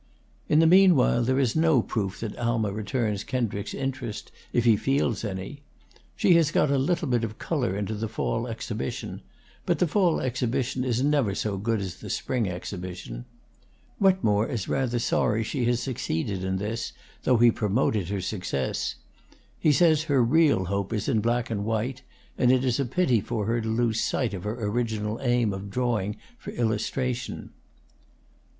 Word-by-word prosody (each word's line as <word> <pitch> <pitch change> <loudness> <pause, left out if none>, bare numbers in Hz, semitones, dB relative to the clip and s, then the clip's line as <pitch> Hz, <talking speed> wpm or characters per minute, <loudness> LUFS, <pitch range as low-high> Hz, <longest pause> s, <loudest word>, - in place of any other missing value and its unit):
In 150 - +4
the 165 - +6
mean 185 +1 +7
while 125 -2 +3
there 130 +2 +1
is 130 -4 +1
no 160 -6 +4
proof 100 -3 -3
that 110 -3 -4
Alma 115 -3 0
returns 105 -1 -2
Kendricks's 115 -6 -2
interest, 130 -5 -4 0.2
if 120 - +1
he 115 -2 +6
feels 135 -1 0
any. 100 +7 -5 0.5
She 180 - +4
has 165 -3 +3
got 150 - +2
a 140 - +2
little 165 +4 0
bit 120 -3 +1
of 110 -1 -4
color 125 - -1
into 105 +1 -2
the 110 +1 -3
fall 115 +2 -2
exhibition; 110 - -5 0.4
but - - +1
the 180 - +2
fall 175 0 +2
exhibition 125 0 -1
is 125 0 0
never 140 -9 +2
so 105 -1 -1
good 110 +2 -1
as 95 -3 -5
the - - -9
spring 120 -5 -1
exhibition. 90 -9 -6 0.7
Wetmore 180 - +3
is 115 -6 -3
rather 125 -3 0
sorry 115 -1 +1
she 120 +3 -2
has 120 0 +1
succeeded 95 - -2
in 95 0 -1
this, 110 +4 -3 0.3
though 125 - +3
he 120 +1 +6
promoted 105 -3 0
her 100 -1 -2
success. 90 -8 -2 0.6
He 155 - +4
says 155 -1 +4
her 140 -5 +3
real 140 - +3
hope 100 +2 -2
is 105 -2 -2
in 115 -5 +2
black 120 +2 0
and 100 -2 -1
white, 115 +4 -2 0.4
and 125 -1 +5
it 130 0 +3
is 125 +1 +1
a 140 - +1
pity 125 - +2
for 110 -1 -3
her 115 +2 0
to 110 - -3
lose 110 -1 +1
sight 125 -6 0
of 95 -1 -6
her 110 +1 -3
original 110 -1 -1
aim 120 -5 +2
of 95 +1 -6
drawing 110 -3 -1 0.2
for - - -8
illustration. 120 +2 -2
115 Hz, 175 wpm, -26 LUFS, 105-130 Hz, 0.7 s, mean